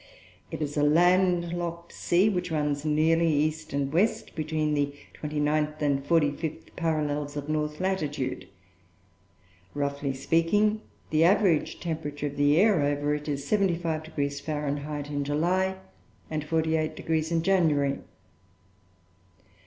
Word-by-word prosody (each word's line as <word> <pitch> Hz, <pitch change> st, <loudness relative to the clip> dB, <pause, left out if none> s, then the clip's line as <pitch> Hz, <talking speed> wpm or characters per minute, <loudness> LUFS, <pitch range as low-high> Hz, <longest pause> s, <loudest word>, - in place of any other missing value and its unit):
It -, -, -4 dB
is 145 Hz, 0 st, -4 dB
a -, -, +3 dB
landlocked 175 Hz, +1 st, +2 dB
sea 180 Hz, +4 st, +2 dB
which 180 Hz, -4 st, -1 dB
runs 150 Hz, -2 st, -1 dB
nearly 160 Hz, +2 st, +3 dB
east 155 Hz, +1 st, 0 dB
and 140 Hz, 0 st, -1 dB
west, 200 Hz, +7 st, +1 dB
between 155 Hz, -1 st, -1 dB
the 145 Hz, -1 st, 0 dB, 0.2 s
twenty 150 Hz, 0 st, -4 dB
ninth 150 Hz, +1 st, 0 dB
and 140 Hz, -2 st, +1 dB
forty 150 Hz, -1 st, +3 dB
fifth 160 Hz, +2 st, -6 dB
parallels 150 Hz, -3 st, -1 dB
of 145 Hz, 0 st, -5 dB
north 150 Hz, 0 st, -2 dB
latitude. 150 Hz, -8 st, -2 dB, 1.3 s
Roughly 140 Hz, -1 st, -1 dB
speaking, 205 Hz, +9 st, +2 dB, 0.3 s
the 155 Hz, +1 st, +4 dB
average 180 Hz, -3 st, +3 dB
temperature 155 Hz, -3 st, -4 dB
of 145 Hz, 0 st, -4 dB
the 145 Hz, +1 st, +3 dB
air 200 Hz, -3 st, +4 dB
over 145 Hz, +1 st, 0 dB
it 150 Hz, 0 st, -4 dB
is 140 Hz, -2 st, -3 dB
75° 160 Hz, -7 st, -1 dB
Fahr. 150 Hz, -1 st, -3 dB, 0.4 s
in 145 Hz, -1 st, -3 dB
July 180 Hz, +6 st, +1 dB, 0.6 s
and 155 Hz, -1 st, -3 dB
48° 160 Hz, 0 st, 0 dB
in 165 Hz, -1 st, +1 dB
January. 155 Hz, -7 st, +2 dB
155 Hz, 125 wpm, -27 LUFS, 145-170 Hz, 1.3 s, the